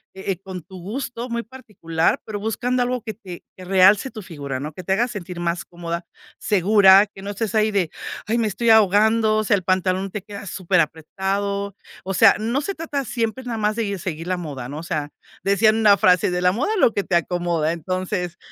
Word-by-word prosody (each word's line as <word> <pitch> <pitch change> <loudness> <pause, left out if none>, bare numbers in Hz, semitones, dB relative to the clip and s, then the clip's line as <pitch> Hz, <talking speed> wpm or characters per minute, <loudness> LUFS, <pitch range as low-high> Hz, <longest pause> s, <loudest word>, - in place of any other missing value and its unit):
e 190 +1 -3
e 180 - -3
con 190 -2 -7
tu 185 +3 -12
gusto 240 +4 -5
muy 235 0 -2
particular, 195 -10 -2
pero 210 -1 -5
buscando 245 +4 0
algo 250 0 -2
que 220 -1 -6
te 185 -5 -10 0.2
que 185 - -10
realce 195 +6 +4
tu 215 - -8
figura, 140 -7 -6
¿no? 150 +2 -6
Que 185 - -9
te 190 - 0
haga 235 +5 +2
sentir 185 -6 -7
más 170 +1 -1
cómoda, 170 0 -5 0.3
segura, 200 0 +5
que 195 -1 -14
no 200 - -6
estés 215 +1 -3
ahí 215 0 +3
de: 190 -5 +1 0.4
"Ay, 230 +2 +1
me 225 -2 +1
estoy 230 +3 -1
ahogando", 220 +1 +4
o 215 - +1
sea, 205 - +4
el 190 - -3
pantalón 185 +1 0
te 210 - -5
queda 200 0 -9
súper 185 -1 +1
apretado. 195 +6 -3 0.3
O 195 - -3
sea, 200 +2 +6
no 230 +6 -1
se 395 +5 -4
trata 290 -4 -3
siempre 235 +2 -2
nada 235 -2 -3
más 210 0 0
de 230 - 0
gui 200 -1 -3
seguir 165 -2 -5
la 185 - 0
moda, 140 -7 -6
¿no? 145 - -6
O 165 - -8
sea, 150 -3 -3 0.3
decían 215 +3 +3
una 210 -2 +6
frase: 185 +2 +4
"De 180 - -1
la 180 0 +4
moda 290 - -1
lo 295 - +4
que 200 - -1
te 185 - -1
acomoda". 170 -2 0
Entonces, 180 0 -3
195 Hz, 220 wpm, -22 LUFS, 180-220 Hz, 0.4 s, sea